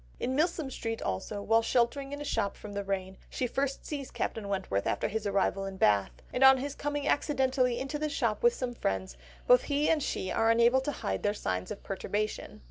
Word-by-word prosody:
In 260 - -1
Milsom 315 -2 0
Street 225 -2 -3
also, 200 - -3
while 225 +2 +4
sheltering 250 +4 +1
in 285 - -5
a 290 - -5
shop 200 - -1
from 210 -1 -9
the 200 0 -2
rain, 190 -1 -3
she 255 - -2
first 275 +2 -2
sees 280 -3 -5
Captain 220 -3 -3
Wentworth 190 - -1
after - - 0
his 215 0 -2
arrival 195 0 +1
in 195 -1 -7
Bath, 100 - +3 0.2
and 255 - +2
on 265 0 +9
his 275 +2 -3
coming 290 0 -3
accidentally 260 -4 +2
into 275 +4 -3
the 305 0 -1
same 285 - -5
shop 230 -5 0
with 475 0 +4
some 250 -2 -3
friends, 95 - -2 0.3
both 250 0 +6
he 290 +1 +2
and 315 -2 +2
she 190 - -2
are 225 - +2
unable 235 +3 +5
to 290 - -2
hide 95 - -3
their 205 +1 0
signs 90 - -3
of - - -7
perturbation. 210 +2 -3
235 Hz, 215 wpm, -30 LUFS, 200-275 Hz, 0.3 s, on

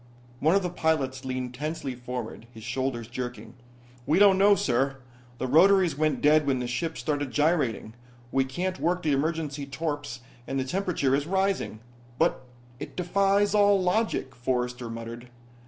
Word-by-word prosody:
One 160 +6 +3
of 200 - +2
the 180 - -2
pilots 135 -6 -1
leaned 130 -1 -3
tensely 145 0 -4
forward, 120 -2 -6
his 110 -2 -12
shoulders 125 -1 -2
jerking. 125 -2 -6 0.5
"We 155 - +3
don't 195 -1 +6
know, 200 +1 +6
sir. 135 -2 0 0.4
The 130 - -2
rotaries 175 +3 +5
went 150 -2 0
dead 150 0 +5
when 135 -2 +2
the 125 - -3
ship 160 +7 -3
started 145 -3 -2
gyrating. 145 -7 0 0.4
We 135 - +3
can't 180 +8 -3
work 180 +2 0
the 155 - +1
emergency 150 -1 -2
torps 145 -4 -4 0.3
and 135 - -2
the - - 0
temperature 165 -3 0
is 145 +2 +1
rising." 190 - 0 0.4
"But 165 -5 +1 0.4
it - - -8
defies 195 +3 +2
all 205 -1 +5
logic," 180 -7 0
Forrester 125 0 -2
muttered. 115 +1 -7
145 Hz, 155 wpm, -27 LUFS, 125-175 Hz, 0.5 s, don't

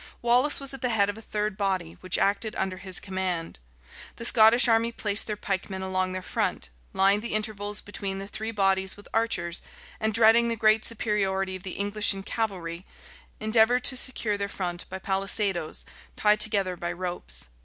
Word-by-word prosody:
Wallace 250 +5 +4
was 275 -1 -2
at 270 - -8
the 250 - 0
head 205 -3 +2
of 205 - -14
a - - -11
third 210 -2 -3
body, 190 -5 -2
which 185 -2 -1
acted 205 +2 +1
under 190 -1 -2
his 185 -1 +1
command. 185 - -4 0.6
The 230 - -4
Scottish 230 +1 +6
army 230 0 +3
placed 210 -2 +1
their 210 -1 -3
pikemen 190 -1 -3
along 185 0 -1
their 185 0 -5
front; - - -1 0.2
lined 195 +2 +3
the 225 -1 -3
intervals 210 -1 -2
between 195 -1 -4
the 195 0 -6
three 220 +2 -5
bodies 195 -3 +1
with 205 - -13
archers; 185 -7 0 0.4
and 220 0 0
dreading 225 +2 +5
the 230 - -1
great 215 0 +3
superiority 195 -4 0
of 185 - -8
the 185 -1 -6
English 205 0 +2
in 195 - -7
cavalry, 185 -6 -4 0.6
endeavored 225 +3 +3
to 260 - +3
secure 230 -5 +1
their 200 0 -2
front 175 -3 -5
by 190 - -5
palisadoes, 195 -3 -1 0.3
tied 210 0 +3
together 200 -4 +3
by 175 0 -4
ropes. 175 - -5
200 Hz, 180 wpm, -26 LUFS, 190-220 Hz, 0.6 s, Scottish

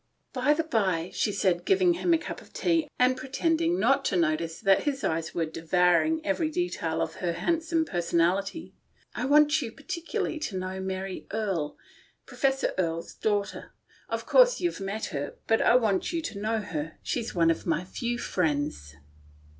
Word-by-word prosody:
" - - -47
By 265 +3 +2
the 325 - 0
bye," 190 - 0
she 210 - 0
said, 180 -3 +1
giving 370 -2 +4
him 345 +1 0
a 330 - +6
cup - - -7
of - - -19
tea 330 -4 +1
and 250 +1 +4
pretending 325 +6 0
not 275 +2 +3
to 190 - +1
notice 165 0 0
that 195 +5 +3
his 275 -2 -1
eyes 160 0 -1
were 165 - +1
devouring 180 - +2
every 310 +1 0
detail 170 - -1
of 160 -1 -6
her 175 -2 -1
handsome 320 - 0
personality, 180 - 0 0.2
" - - -35
I 245 - -2
want 295 +2 +5
you 235 -4 -4
particu 335 +6 -7
larly 310 - -2
to 210 -11 -3
know 185 +1 -4
Mary 190 0 -4
Erie 195 -9 -1 0.2
— - - -31
Professor 270 0 0
Erie's 165 -2 -2
daughter, 205 -2 -1
you - - -12 0.4
know. - - -6
Of - - -6
course - - +5
you've 350 - -1
met 200 +3 -3
her, 145 0 -4
but 225 - +2
I - - +5
want 215 -6 +2
you 335 -2 -2
to 220 -11 -5
know 220 +1 0
her. 160 -6 -5
She's 235 -5 -3
one 165 -1 +4
of 165 - -4
my 165 0 +1
few 240 +5 -3
friends." 145 - -2
210 Hz, 190 wpm, -27 LUFS, -, 0.4 s, a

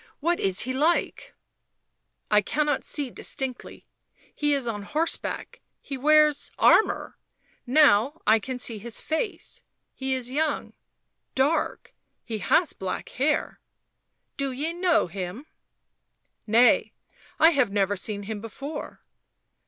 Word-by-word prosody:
" - - -44
What 350 - +1
is 190 +1 +1
he 255 +2 -2
like 310 +6 0 0.3
?" - - -53
" - - -47
i 210 0 +5
cannot 295 +6 0
see 285 -4 -3
distinctly... 260 +1 -5 0.5
he 295 -1 0
is 275 -3 -2
on 210 -3 -3
horseback.. 305 +10 -3 0.2
he 275 - -7
wears 300 +2 +4
armour... 440 - +3 0.5
now 275 +1 +4
I 220 +1 +5
can 255 +5 -5
see 230 -3 -2
his 235 +2 -3
face 335 +3 -4 0.3
he 265 0 -2
is 250 -1 -3
young, 310 +3 -1 0.6
dark 280 +5 0
— - - -50
he 220 -3 -4
has 320 - +2
black 190 -1 -5
hair 290 +4 -1 0.3
" - - -52
" - - -51
Do 275 -1 -1
ye 295 +6 -3
know 350 -1 +2
him?" 185 - -6 0.5
" - - -49 0.2
Nay 230 +3 +4 0.2
— - - -28
I 325 - +7
have 265 -8 +2
never 200 0 +1
seen 205 +1 -3
him 210 0 -5
before." 275 +7 -7
265 Hz, 145 wpm, -25 LUFS, 215-300 Hz, 0.6 s, I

